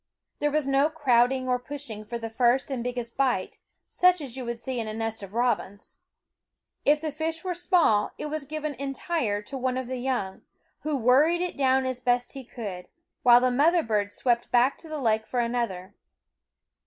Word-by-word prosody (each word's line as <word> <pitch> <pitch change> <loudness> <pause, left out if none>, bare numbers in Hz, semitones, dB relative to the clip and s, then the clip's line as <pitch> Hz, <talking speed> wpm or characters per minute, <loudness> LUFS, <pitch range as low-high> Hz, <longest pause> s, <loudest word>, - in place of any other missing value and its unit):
There 295 - +1
was 300 -1 0
no 275 +2 +3
crowding 260 -4 +2
or 250 -1 +1
push 285 +3 -7
ing 215 -2 -7
for 235 +2 -4
the 225 -1 -5
first 245 +4 +2
and 250 -3 -2
biggest 245 -1 -4
bite, 250 -8 0 0.3
such 365 0 +3
as 270 -5 -7
you 235 -3 -4
see 255 +1 -4
in 225 - -3
a 215 - -4
nest 225 -1 -3
of 200 +1 -10
robins. 235 -4 -1 0.9
If 300 +1 +4
the 310 0 -3
fish 320 +2 -3
were 370 -1 -2
small, 335 - +3
it - - -5
was 300 -2 -4
given 305 0 -3
entire 275 - -2
to 270 +6 -6
one 255 0 -1
of 260 - -3
the 255 +1 -4
young, 245 -7 -2 0.4
who 305 -2 -2
worried 280 +8 +4
it 360 - -3
down 265 -1 +2
as 255 -1 -2
best 245 -1 0
he 270 - -7
could, 205 -7 -7 0.3
while 245 -2 +7
the 255 0 +2
mother 320 +7 +3
bird 205 -2 0
swept 240 0 0
back 245 +3 +3
to 325 - -12
the 310 - -4
lake 220 -5 +1
for 250 - -2
another. 235 -6 -2
255 Hz, 195 wpm, -26 LUFS, 235-290 Hz, 0.9 s, while